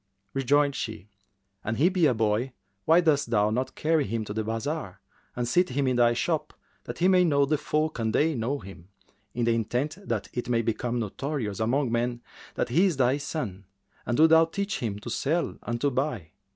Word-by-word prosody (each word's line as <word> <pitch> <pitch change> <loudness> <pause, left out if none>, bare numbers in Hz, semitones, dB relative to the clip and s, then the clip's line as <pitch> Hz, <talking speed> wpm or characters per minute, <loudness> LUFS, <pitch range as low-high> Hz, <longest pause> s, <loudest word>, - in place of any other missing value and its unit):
Rejoined 140 +1 +2
she, 110 -5 -5 0.5
"An 110 - -2
he 150 +8 +4
be 180 -4 +3
a 125 - +2
boy, 110 +4 0 0.3
why 165 +2 +5
dost 150 -6 +2
thou 105 -2 +2
not 130 +3 -2
carry 155 -3 +1
him 110 +1 -2
to 105 - -5
the 110 +1 -2
bazar 115 - -4 0.4
and 120 0 -2
seat 180 +10 +2
him 135 +2 0
in 130 -1 +1
thy 120 -1 +4
shop, 120 - -2 0.3
that - - -6
he 180 - +3
may 185 -1 +5
know 140 -4 +3
the 150 +1 0
folk 155 -2 -1
and 110 -1 0
they 155 +8 +2
know 125 +3 -1
him, 95 -6 -12 0.5
to 120 - 0
the 115 0 +3
intent 125 - -1
that 110 -4 -2
it 120 0 -4
may 115 -1 +2
become 120 +2 -1
notorious 115 -1 -3
among 125 +3 +1
men 120 0 -1 0.3
that - - -1
he 170 +11 +4
is 170 -7 -1
thy 130 +1 +3
son, 125 - -5 0.4
and 120 - -1
do 155 - +7
thou 160 0 +6
teach 200 +5 -3
him 105 -4 -3
to 105 - -7
sell 165 +5 -1
and 120 0 -3
to 145 - +2
buy. 125 - -2
125 Hz, 205 wpm, -27 LUFS, 115-150 Hz, 0.5 s, do